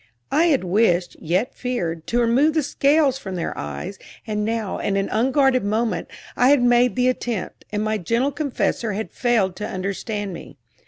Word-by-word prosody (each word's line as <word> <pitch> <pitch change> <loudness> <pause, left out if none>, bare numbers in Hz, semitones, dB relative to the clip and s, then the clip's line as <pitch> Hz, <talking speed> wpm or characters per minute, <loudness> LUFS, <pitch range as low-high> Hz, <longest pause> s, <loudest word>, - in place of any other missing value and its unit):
I 310 +4 +4
had 290 - +2
wished, 180 -2 +2
yet 180 +9 0
feared, 170 -11 -3
to 240 - +1
remove 265 +7 +3
the 315 - +2
scales 280 0 +2
from 190 -7 -6
their 170 - -3
eyes; 75 - -6 0.3
and 210 -1 -2
now, 220 -2 -2
in 195 - 0
an 195 - -1
unguarded 260 +2 +2
moment, 210 -3 -1 0.3
I 250 - +4
had 285 -3 +5
made 245 0 +4
the 250 0 +2
attempt, 240 -5 -3
and 210 0 -1
my 215 0 0
gentle 235 +9 0
confessor 275 -6 -1
had 215 +2 -4
failed 225 -7 +1
to 210 - -4
understand 200 +1 -3
me. - - -10
230 Hz, 175 wpm, -22 LUFS, 195-255 Hz, 0.3 s, had